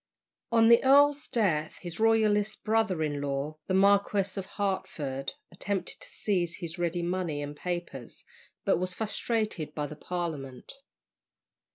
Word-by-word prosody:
On 225 -1 +5
the 235 - +7
earl's 285 +2 +5
death, 165 -9 0
his 170 -2 -6
Royalist 215 -2 +2
brother 215 -7 +1
in 145 -2 -2
law, 145 +2 -3
the 185 - +1
Marquis 200 0 +3
of 195 -2 -4
Hertford, 145 -9 -2 0.2
attempted 195 +2 -3
to - - -9
seize 175 -5 -1
his 170 -1 -6
ready 175 0 -1
money 175 -4 -1
and 145 0 -6
papers, 170 -7 -5 0.4
but - - +3
was 185 0 -1
frustrated 215 -7 -2
by 150 - -1
the 150 +1 -7
Parliament. 150 -6 -5
180 Hz, 140 wpm, -29 LUFS, 155-210 Hz, 0.4 s, the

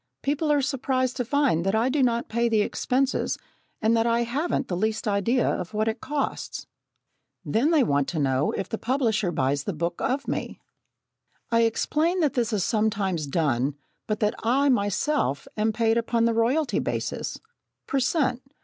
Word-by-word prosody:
People 295 +2 0
are 290 -2 +3
surprised 260 -2 0
to 250 - 0
find 260 - +1
that 195 +3 +1
I 225 +3 +2
do 275 +2 +1
not 235 -2 +1
pay 235 +1 +1
the 220 -2 +3
expenses 260 +5 0 0.5
and 225 +1 +4
that 225 0 +2
I 235 0 +2
haven't 275 +3 -1
the 180 - -2
least 215 +4 -1
idea 215 +5 +1
of 180 +4 -2
what 215 +1 +1
it 225 - -2
costs. 290 0 -3 0.8
Then 240 +8 +2
they 315 -5 +4
want 140 - +1
to 170 - -3
know 135 0 +1
if 190 - -3
the 225 - -4
publisher 225 -7 0
buys 140 -2 0
the 200 - -2
book 170 +2 -3
of 280 +2 -1
me. - - -3 0.9
I 230 0 +4
explain 315 +10 +1
that 300 -4 +2
this 240 -3 0
is 205 -4 0
sometimes 200 -8 0
done, 140 -3 0 0.3
but 215 -1 -2
that 210 0 +2
I 270 +5 +2
myself 205 - 0
am 215 +1 +1
paid 225 +1 +2
upon 230 0 +1
the 230 - +2
royalty 255 +7 +1
basis, - - -3 0.5
per 275 - 0
cent. 260 -2 +1
230 Hz, 175 wpm, -25 LUFS, 200-265 Hz, 0.9 s, and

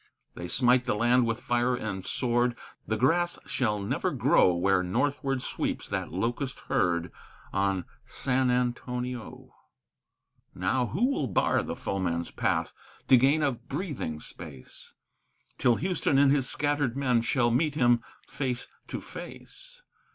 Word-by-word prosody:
They 90 - -6
smite 125 +3 +3
the 120 - 0
land 120 +2 +3
with 115 0 -1
fire 120 0 +1
and 105 -6 -4
sword; 120 +3 0 0.3
the 110 - 0
grass 170 +9 +2
shall 105 -5 0
never 100 - -1
grow 90 - +4
Where 90 +2 +2
northward 135 +7 -1
sweeps - - -3
that - - -3
locust 120 - -2
herd 85 -2 0 0.4
on 95 -2 0 0.2
San 130 -1 0
Antonio! 125 -1 -3 1.0
Now 120 +8 0
who 195 - +1
will 255 - 0
bar - - +2
the - - -4
foeman's 85 -3 -2
path, - - -1 0.4
to 130 - +9
gain 140 +5 +4
a 140 - +3
breathing 130 - -5
space, 75 -5 -11 0.6
Till 120 - +4
Houston 175 -2 +1
and 140 0 +5
his 135 -3 +3
scattered 145 -4 0
men 125 -4 +2
shall 120 0 +1
meet 145 +5 +1
him 120 -4 +4 0.3
face 125 -3 -3 0.2
to - - -5
face? - - -10
125 Hz, 135 wpm, -28 LUFS, 105-135 Hz, 1.0 s, to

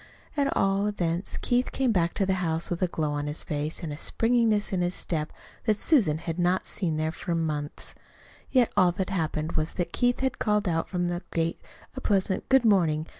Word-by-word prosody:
At 280 -2 +1
all 195 +1 +2
events, 175 -3 -1
Keith 245 +1 +1
came 265 -3 +1
back 175 -4 +1
to 195 - +1
the 190 - +1
house 165 0 -1
with 175 - -2
a 185 - +3
glow 155 -3 -2
on 145 0 -2
his 150 +1 -3
face 150 +3 -3
and 155 -3 -3
a - - -7
springiness 225 +1 +2
in 185 - +1
his 175 +1 0
step 155 -3 -2 0.3
that 215 -2 +2
Susan 210 - +3
had 165 +1 -5
not 180 +2 +2
seen 165 -6 0
there 155 0 0
for 170 +1 -3
months. 150 -3 -3 0.6
Yet 250 -3 +3
all 185 -3 +5
that 190 +2 -3
had - - -1
happened 160 -1 -1
was 155 0 -2
that 175 -1 -2
Keith 245 +1 +1
had 265 -1 -1
called 210 -1 +1
out 165 -2 0
from 175 -2 -1
the 175 0 -2
gate 165 0 -1 0.3
a 265 - -5
pleasant 195 -3 0
"Good 265 -2 +5
morning!" 165 -7 +3
175 Hz, 215 wpm, -27 LUFS, 160-210 Hz, 0.6 s, all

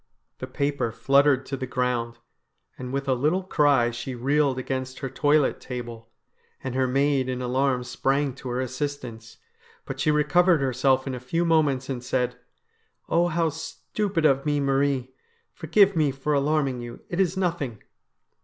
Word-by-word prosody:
The - - -5
paper 140 -5 -1
fluttered 140 +2 +3
to 135 - -4
the 130 -1 -5
ground, 125 -2 -1 0.6
and 125 -1 -7
with 140 +1 -3
a 130 - +3
little 155 +9 +1
cry 145 -9 +3
she 120 +2 -5
reeled 140 +2 +1
against 130 0 -4
her 135 - -4
toilet 145 +1 +2
table, 120 -3 -7 0.5
and 130 - -4
her 130 0 +1
maid 135 0 +1
in 125 -1 -2
alarm 125 0 0
sprang 135 +2 0
to 130 0 -8
her 125 +1 -2
assistance. 130 -4 -5 0.5
But - - -6
she - - +1
recovered 155 +3 +4
herself 130 0 +1
in 135 - -3
a 125 - -5
few 165 +8 -1
moments, 150 -5 +2
and 125 -3 -4
said: 125 -1 -1 0.4
' - - -39
Oh, 170 +1 +3
how 165 -1 +1
stupid 165 +3 -3
of 135 -2 +3
me, 145 -1 0
Marie! 135 -2 0 0.4
Forgive 190 +4 +3
me 155 -3 +3
for 135 +2 -2
alarming 140 -3 +1
you. 120 0 -9
It 175 - -4
is 190 -1 +1
nothing 165 - -2
135 Hz, 165 wpm, -25 LUFS, 125-150 Hz, 0.6 s, recovered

